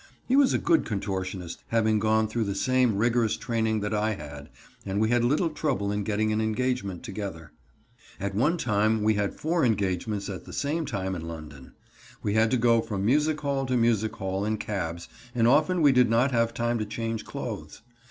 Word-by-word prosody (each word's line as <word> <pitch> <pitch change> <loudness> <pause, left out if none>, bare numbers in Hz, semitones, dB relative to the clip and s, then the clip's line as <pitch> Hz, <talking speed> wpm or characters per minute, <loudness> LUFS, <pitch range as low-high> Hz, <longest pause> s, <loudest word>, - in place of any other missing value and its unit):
He 255 - +2
was 280 -2 +5
a - - +2
good 335 -3 +2
contortionist, 95 -4 -4
having 110 -2 +2
gone 110 +1 +2
through 110 +1 -1
the 100 -1 -2
same 125 -1 +2
rigorous 115 0 +2
training 110 -3 -1
that 105 +1 -2
I 105 +1 0
had, 75 -3 -9 0.3
and 100 0 -2
we 110 +1 +2
had 120 0 +3
little 155 +7 +2
trouble 135 -10 -1
in 105 0 -1
getting 110 +1 0
an 110 - 0
engagement 110 -3 -1
together. 95 - -6 0.7
At 100 0 -3
one 150 - +2
time 110 -4 +1
we 110 +1 +4
had 100 -1 -1
four 165 +2 0
engagements 100 -2 0
at 95 -2 -6
the - - -10
same 150 +2 -1
time 95 -3 -2
in 85 -2 -5
London. 75 -5 -9 0.5
We 100 - 0
had 110 +1 +3
to 130 - +2
go 115 -1 +4
from 105 -4 -3
music 150 +5 +2
hall 140 -2 -1
to 125 0 +1
music 110 -2 +1
hall 95 +1 -2
in 110 +1 0
cabs, 85 -6 -4 0.3
and 115 -1 +3
often 155 +6 +3
we 145 - +7
did 125 -3 +4
not 120 +4 +3
have 115 -1 +2
time 120 0 -1
to 110 - -1
change 115 +1 -3
clothes. - - -7
110 Hz, 200 wpm, -27 LUFS, 100-125 Hz, 0.7 s, we